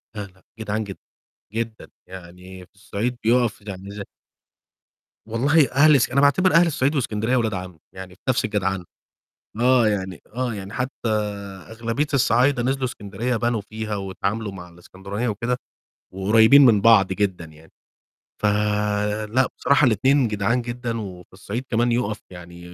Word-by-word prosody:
لا، 105 - -4
لأ 95 0 -24 0.2
جدعان 110 0 -2
جدًا، 100 -2 -9 0.5
جدًا. 115 -1 -4 0.2
يعني 90 0 -11
في - - -38
الصعيد 110 +4 -4
بيقف 115 -2 +2
يعني 100 -1 -8
زي 100 0 -6 1.2
والله 140 +7 +3
أهل 150 +3 +6
إسك 130 - +2
أنا 140 - +3
باعتبر 180 +7 +3
أهل 170 +1 +6
الصعيد 145 -2 0
وإسكندرية 115 -2 0
ولاد 110 -3 0
عَم، 90 -3 -7
يعني 95 -1 -10
في - - -34
نَفْس 130 0 +2
الجدعنة. 95 -4 -2 0.8
آه 125 -1 +4
يعني 95 -4 -3
آه 125 -2 -2
يعني 100 -1 -8
حتى 125 0 -4 0.6
أغلبية 115 +6 -2
الصعايدة 130 0 +3
نزلوا 135 +2 -1
إسكندرية 115 +1 -3
بنوا 120 -1 0
فيها 110 +1 -5
واتعاملوا 100 +2 -3
مع 90 -2 -10
الإسكندرانية 95 +6 -6
وكده، 115 +3 -1 0.6
وقريبين 110 +8 +6
من 110 -5 +5
بعض 110 -3 +6
جدًا 95 -4 -2
يعني. 80 0 -17 0.7
فلأ 105 +3 0
بصراحة 140 +2 +3
الاتنين 130 +4 +3
جدعان 105 +4 0
جدًا، 120 -1 -4
وفي 90 -4 -9
الصعيد 100 +6 -6
كمان 120 +1 +1
يُقف 110 -3 -1
يعني 85 -1 -11
110 Hz, 145 wpm, -22 LUFS, 95-125 Hz, 1.2 s, أهل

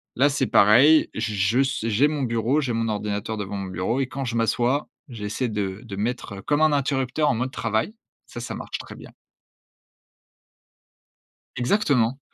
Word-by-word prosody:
Là, 140 +3 +4
c'est 135 -2 0
pareil. 130 +10 +6
J 110 -1 -2
je 105 +7 +2
su 130 -4 -2
j'ai 125 +8 +3
mon 150 -2 -2
bureau, 120 +5 +1
j'ai 125 -4 -2
mon 115 0 -1
ordinateur 105 +1 -3
devant 100 0 -5
mon 95 -1 -4
bureau 95 +8 -2
et 135 - +1
quand 135 +2 -5
je 120 -1 -3
m'assois, 120 +4 +1 0.2
j'essaie 115 +1 -3
de 100 -2 -3
de 105 -4 -7
mettre 105 -2 -4
comme 145 +8 0
un 155 -1 +5
interrupteur 140 +1 0
en 115 - +1
mode 130 +3 -2
travail. 115 - -2 0.3
Ça 120 - -8
ça 125 - -5
marche - - -5
très - - -10
bien. - - -12 2.4
Exactement. 125 - +1
120 Hz, 170 wpm, -24 LUFS, 105-135 Hz, 2.4 s, pareil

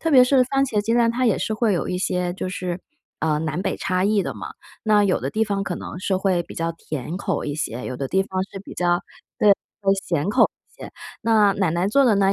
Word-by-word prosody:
特 325 - 0
别 255 -4 +8
是 255 0 +4
番 270 +2 +1
茄 215 -6 0
鸡 225 +3 0
蛋 235 -1 +4
它 250 +2 0
也 220 - +3
是 - - -2
会 215 -2 +2
有 175 - -1
一 180 - -2
些， 180 -1 -1
就 185 - -4
是， 180 -1 -4 0.4
呃， 150 -1 +1
南 155 +3 -2
北 - - -1
差 185 -1 0
异 205 +1 +3
的 - - -3
嘛。 - - -7 0.3
那 210 -1 +4
有 190 - +1
的 135 - -3
地 220 +6 +1
方 200 -2 -1
可 185 -3 -3
能 - - -7
是 190 0 0
会 185 -2 +1
比 - - -12
较 165 0 -1
甜 155 -1 -5
口 200 - -2
一 145 - -3
些， 125 -5 -4
有 130 - -4
的 135 +1 -3
地 190 - +2
方 185 -1 -2
是 - - -7
比 - - -9
较 175 -1 +2 0.4
对， 210 - +6 0.3
会 195 -1 +3
咸 170 +1 -1
口 - - +4 0.3
一 - - -12
些。 - - -7 0.3
那 215 -3 +4
奶 195 -4 0
奶 170 +3 0
做 275 +7 +4
的 225 -5 +4
那 195 0 +3
195 Hz, 280 characters per minute, -23 LUFS, 175-215 Hz, 0.4 s, 别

